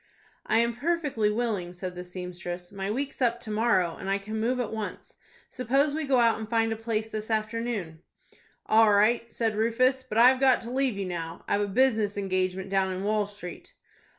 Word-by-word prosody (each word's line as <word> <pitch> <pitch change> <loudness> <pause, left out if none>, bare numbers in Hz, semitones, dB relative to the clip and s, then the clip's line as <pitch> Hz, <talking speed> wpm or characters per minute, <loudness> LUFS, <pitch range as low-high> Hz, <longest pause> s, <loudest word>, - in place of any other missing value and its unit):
"I 220 - +3
am 235 0 +2
perfectly 295 -8 0
willing," 210 -6 -2
said 180 0 -6
the 180 0 -7
seamstress. 180 -1 -7
"My 195 0 -4
week's 275 +5 -3
up 240 -1 +2
to 220 - -6
morrow, 210 -6 +1
and 195 - -6
I 195 - +2
can 215 +2 -5
move 245 +3 0
at 235 -3 -2
once. 220 -1 -6 0.3
Suppose 270 +4 +1
we 315 0 -2
go 265 -2 +3
out 230 -2 +3
and 220 -1 -6
find 225 -1 +1
a - - -4
place 220 -1 -2
this 215 0 -5
afternoon." 215 -6 -2 0.6
"All 220 -1 +5
right," 225 +3 +3
said 225 -2 -1
Rufus. 255 +4 +2
"But 255 -4 -5
I've 250 +3 +6
got 260 -2 +4
to 235 - -7
leave 260 -4 0
you 195 - -2
now. 170 -2 -6
I've 205 - +1
a 205 - 0
business 215 -2 +2
engagement 185 -1 -1
down 190 -1 +1
in 185 +1 -4
Wall 210 0 +1
Street." 205 -4 -10
220 Hz, 200 wpm, -27 LUFS, 195-240 Hz, 0.6 s, I've